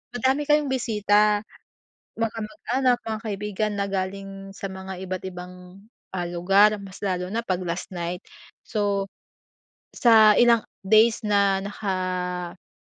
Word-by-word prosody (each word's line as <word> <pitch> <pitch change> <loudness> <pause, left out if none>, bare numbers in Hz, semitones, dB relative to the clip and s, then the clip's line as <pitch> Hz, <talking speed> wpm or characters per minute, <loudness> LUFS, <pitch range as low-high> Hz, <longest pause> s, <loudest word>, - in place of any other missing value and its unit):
madami 265 +4 +1
kayong 295 -2 +3
bisita. 210 -3 +2 0.8
Mga 225 -1 0
kamag-anak 240 +4 0
mga 220 -1 -3
kaibigan 210 0 -2
na 200 0 -1
galing 195 0 -5
sa 195 - -5
mga 190 -1 -7
iba't 185 0 -4
ibang 180 0 -8 0.6
ah, 175 -1 -2
lugar 195 +5 +4
mas 195 -1 -11
lalo 180 -2 -1
na 230 +3 -1
pag 185 -1 0
last 170 +2 -4
night. 175 0 -4 0.4
So, 200 -2 -1 0.9
sa 220 -3 +6
ilang 235 -2 +5 0.2
days 220 +3 +4
na 200 -1 +2
naka-burol 180 - -4
200 Hz, 125 wpm, -24 LUFS, 185-220 Hz, 0.9 s, sa